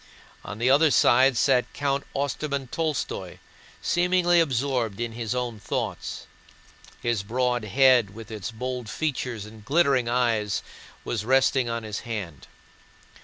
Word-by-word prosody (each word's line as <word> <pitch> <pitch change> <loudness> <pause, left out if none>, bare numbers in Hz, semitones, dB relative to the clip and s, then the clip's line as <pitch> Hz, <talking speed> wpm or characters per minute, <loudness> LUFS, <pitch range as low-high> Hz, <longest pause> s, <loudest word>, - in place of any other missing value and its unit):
On 105 - -7
the 120 +3 0
other 155 +3 +5
side 130 +1 +4
sat 125 +1 +2
Count 140 -1 -1
Ostermann 140 -1 -2
Tolstóy, 160 -4 -3 0.5
seemingly 175 0 +3
absorbed 130 -7 0
in 120 -1 -2
his 115 +1 -3
own 120 -3 -3
thoughts. 105 - -4 0.8
His 120 -4 0
broad 120 +2 -1
head 120 -2 +4
with 115 0 -10
its 110 -1 -5
bold 125 0 -5
features 125 -8 -3
and 110 0 -13
glittering 135 -3 +2
eyes 115 -4 0 0.4
was 110 -3 -2
resting 130 0 +3
on 115 0 -3
his 105 -1 -4
hand. 100 - -6
125 Hz, 130 wpm, -25 LUFS, 110-135 Hz, 0.8 s, other